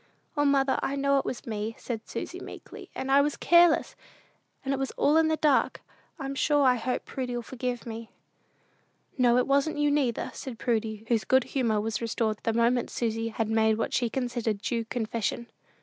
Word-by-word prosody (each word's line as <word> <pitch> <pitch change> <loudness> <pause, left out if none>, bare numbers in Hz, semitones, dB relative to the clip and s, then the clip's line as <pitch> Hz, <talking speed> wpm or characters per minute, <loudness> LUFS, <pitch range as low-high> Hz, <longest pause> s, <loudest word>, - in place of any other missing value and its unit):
"O, 290 -1 +2
mother, 275 -1 +3
I 275 - -1
know 280 0 +2
it - - -4
was 245 - -4
me," 220 0 -3
said 225 -3 -5
Susy - - -5
meekly; - - -10
"and 265 - -3
I 280 +1 +6
was 295 +1 -1
careless, 345 -1 +4 0.7
and 270 - 0
it 270 - -2
was 270 - -1
all 295 - +3
in 320 0 +5
the 315 0 +1
dark. 295 -4 +2 0.3
I'm 275 -2 -4
sure 290 +1 +2
I 255 -2 +6
hope 250 +1 -2
Prudy'll 245 -2 -4
forgive 250 0 -4
me." 225 -1 -7 1.1
"No, 245 -1 +5
it 250 - +3
wasn't 280 +3 +1
you, 295 0 +2
neither," 270 -6 0
said 255 -4 -7
Prudy, 220 -2 -2
whose 230 -2 +1
good 260 -1 +3
humor 230 -6 0
was 220 +2 -2
restored 225 -2 -1
the 225 - 0
moment 235 +2 +2
Susy 225 -1 -2
had 225 -1 -2
made 220 0 +2
what 225 - -2
she 240 -2 +1
considered 240 -4 -2
due 230 +2 -2
confession. 230 0 -2
245 Hz, 190 wpm, -28 LUFS, 225-275 Hz, 1.1 s, I